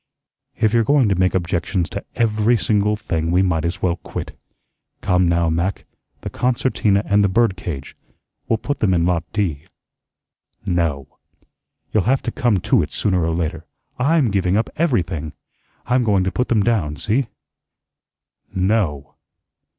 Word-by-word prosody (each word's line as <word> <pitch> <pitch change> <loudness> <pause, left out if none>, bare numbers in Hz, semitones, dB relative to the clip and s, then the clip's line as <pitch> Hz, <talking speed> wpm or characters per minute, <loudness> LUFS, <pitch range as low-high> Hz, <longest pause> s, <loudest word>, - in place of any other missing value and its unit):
"If 110 0 +1
you're 115 -1 +4
going 135 -2 +3
to 95 - +2
make 95 0 +2
objections 90 0 -1
to - - -5
every 115 0 +2
single 105 -1 +1
thing, 85 -6 -2
we 90 +2 +3
might 80 -4 0
as 85 +2 -3
well 90 -1 +1
quit. - - -7 0.7
Come, 90 -2 +2
now, 85 0 +2
Mac, 85 +4 -2 0.4
the - - -5
concertina 120 -5 +1
and 100 0 +3
the 100 - +3
bird 115 0 +2
cage. 80 -6 -6 0.5
We'll 115 - +2
put 145 +6 -3
them 95 -4 +2
in 85 -1 +2
Lot 85 -1 -1
D." 90 -10 -2 1.0
"No." 85 -7 -2 0.7
"You'll 105 -4 +2
have 135 0 +2
to 120 - -2
come 120 -4 +1
to 125 +3 +3
it 75 - -4
sooner 95 -5 0
or 80 0 0
later. 80 -1 -3 0.3
I'M 140 -3 +2
giving 95 -1 +1
up 110 - -1
everything. 90 - -1 0.5
I'm 125 +2 +2
going 100 -5 +2
to 95 - -1
put 125 - -1
them 110 -4 +2
down, 100 -11 0
see." 110 - 0 1.3
"No." 90 - 0
95 Hz, 160 wpm, -20 LUFS, 85-115 Hz, 1.3 s, you're